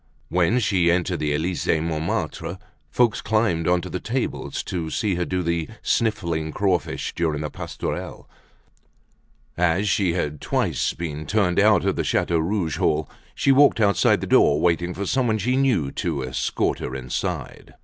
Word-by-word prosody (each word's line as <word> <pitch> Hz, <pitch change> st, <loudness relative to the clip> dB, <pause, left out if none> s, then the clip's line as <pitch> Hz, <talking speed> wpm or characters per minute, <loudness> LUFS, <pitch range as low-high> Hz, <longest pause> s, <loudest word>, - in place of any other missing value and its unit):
When 90 Hz, +6 st, +2 dB
she 95 Hz, -6 st, +2 dB
entered 90 Hz, 0 st, +1 dB
the 75 Hz, -1 st, -1 dB
"Elysee 80 Hz, +1 st, 0 dB
Montmartre," 80 Hz, +1 st, -3 dB, 0.3 s
folks 120 Hz, -3 st, +2 dB
climbed 105 Hz, -7 st, +1 dB
onto 90 Hz, -1 st, +1 dB
the -, -, -4 dB
tables -, -, -3 dB
to 85 Hz, -3 st, -4 dB
see 105 Hz, +4 st, 0 dB
her 90 Hz, 0 st, -1 dB
do 90 Hz, 0 st, -2 dB
the 85 Hz, -1 st, -1 dB, 0.2 s
"sniffling 85 Hz, -9 st, 0 dB
crawfish" 95 Hz, -4 st, -1 dB
during 80 Hz, -3 st, -1 dB
the 75 Hz, -, -4 dB
pastourelle. -, -, -5 dB, 1.3 s
As 90 Hz, +4 st, +1 dB
she 95 Hz, -2 st, +2 dB
had 75 Hz, -4 st, -3 dB
twice -, -, 0 dB
been 75 Hz, -2 st, -5 dB
turned 100 Hz, -5 st, +2 dB
out -, -, +4 dB
of -, -, 0 dB
the -, -, 0 dB
"Chateau 85 Hz, -1 st, +1 dB
Rouge" 85 Hz, -1 st, -1 dB
hall, 75 Hz, 0 st, 0 dB, 0.2 s
she 135 Hz, -, +3 dB
walked 140 Hz, -2 st, +5 dB
outside 100 Hz, -2 st, +3 dB
the -, -, -2 dB
door 75 Hz, -, +4 dB
waiting 85 Hz, +1 st, +1 dB
for 100 Hz, -, -3 dB
someone 115 Hz, 0 st, +1 dB
she 125 Hz, +5 st, 0 dB
knew 125 Hz, -, +1 dB
to 80 Hz, -7 st, -2 dB
escort 65 Hz, 0 st, -1 dB
her 65 Hz, -, -5 dB
inside. 65 Hz, -2 st, -5 dB
85 Hz, 160 wpm, -23 LUFS, 80-100 Hz, 1.3 s, walked